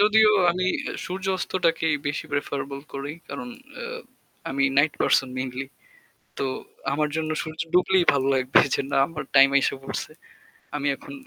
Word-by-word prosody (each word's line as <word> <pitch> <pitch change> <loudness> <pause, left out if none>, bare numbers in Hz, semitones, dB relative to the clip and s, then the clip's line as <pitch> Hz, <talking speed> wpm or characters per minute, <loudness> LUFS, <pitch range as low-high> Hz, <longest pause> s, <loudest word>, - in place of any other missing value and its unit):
যদিও 215 +1 +6 0.2
আমি 185 +1 -1 0.4
সূর্য 185 +1 -5
অস্তটাকেই 165 -4 +1
বেশি 145 +2 -2
প্রেফারেবল 140 -1 -3
করি। 140 +1 -4 0.2
কারণ 125 -3 -6 0.3
আ - - -5 0.7
আমি 135 +1 +1
নাইট 145 +1 +4
পারসন 135 - +3
মেইনলি। 130 +1 -4 0.7
তো 135 - 0 0.5
আমার 150 +1 +1
জন্য 155 0 -2
সূর্য 155 0 -7
ডুবলেই 180 0 +4
ভালো 135 -1 +1
লাগবে 130 0 +4
যে - - 0
না - - +2
আমার 155 -3 -6
টাইম 135 0 +9
আইসা 140 - +2
পড়ছে। 135 - -5 0.6
আমি 145 -1 -1
এখন 285 - -11
145 Hz, 150 wpm, -25 LUFS, 135-175 Hz, 0.7 s, টাইম